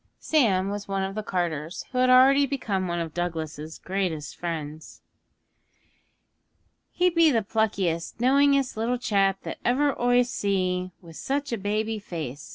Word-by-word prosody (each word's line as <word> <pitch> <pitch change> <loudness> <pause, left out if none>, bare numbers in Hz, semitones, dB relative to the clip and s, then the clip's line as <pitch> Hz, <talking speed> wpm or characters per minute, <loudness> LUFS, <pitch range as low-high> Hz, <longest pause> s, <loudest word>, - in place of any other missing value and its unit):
Sam 200 -11 +2
was 205 0 -5
one 195 -1 -1
of 190 0 -3
the 215 - -3
carters, 170 -4 -3
who 250 - -1
had 255 0 +4
already 270 +2 +6
become 205 -9 -2
one 175 0 -2
of 165 -2 -4
Douglas's 160 -3 -4
greatest 180 -6 -3
friends. 155 -3 -6 1.9
'He 360 0 +2
be 335 -1 +5
the 230 -6 +1
pluckiest, 195 -6 -1
knowingest 275 +1 +3
little 230 +3 -1
chap 195 -5 +1
that - - -6
ever 280 +3 +2
oi 245 0 +4
see 185 -5 -1
wi' 170 - -12
such 280 - -3
a 235 - -1
baby 215 +2 -1
face!' 155 -9 -7
200 Hz, 150 wpm, -26 LUFS, 175-250 Hz, 1.9 s, already